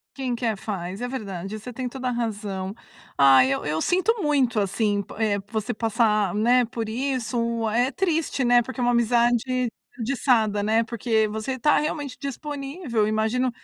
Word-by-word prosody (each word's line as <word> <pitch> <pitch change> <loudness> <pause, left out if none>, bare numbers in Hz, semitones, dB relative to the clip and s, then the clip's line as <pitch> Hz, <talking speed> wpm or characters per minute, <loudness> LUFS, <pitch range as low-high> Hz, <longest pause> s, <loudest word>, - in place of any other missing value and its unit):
Quem 260 -3 -2
quer 230 -3 -1
faz, 190 -1 -5
é 245 - -2
verdade, 200 -5 -5
você 245 +4 -8
tem 255 +1 -4
toda 255 +1 -4
a - - +1
razão. 205 -5 -3 0.4
Ah, 135 -1 +7
eu 135 +1 -1
eu 155 +2 -1
sinto 375 +5 +2
muito, 270 -7 +2
assim, 205 +1 0
po - - -12
eh, 215 -2 +1
você 220 -2 -2
passar, 215 -3 +1
né, 240 +4 +3
por 225 0 -4
isso, 235 -1 -1
é 245 +4 +2
triste, 325 -4 0
né, 245 0 +5
porque 260 +3 -9
é - - 0
uma 245 - +3
amizade 240 +1 +2 0.3
desperdiçada, 225 -4 +1
né, 220 +2 +2
porque 225 -1 0
você 220 +5 -4
tá 295 +5 +4
realmente 295 -3 -3
disponível. 275 - -3
Imagino 220 +4 +1
235 Hz, 165 wpm, -24 LUFS, 215-255 Hz, 0.4 s, Ah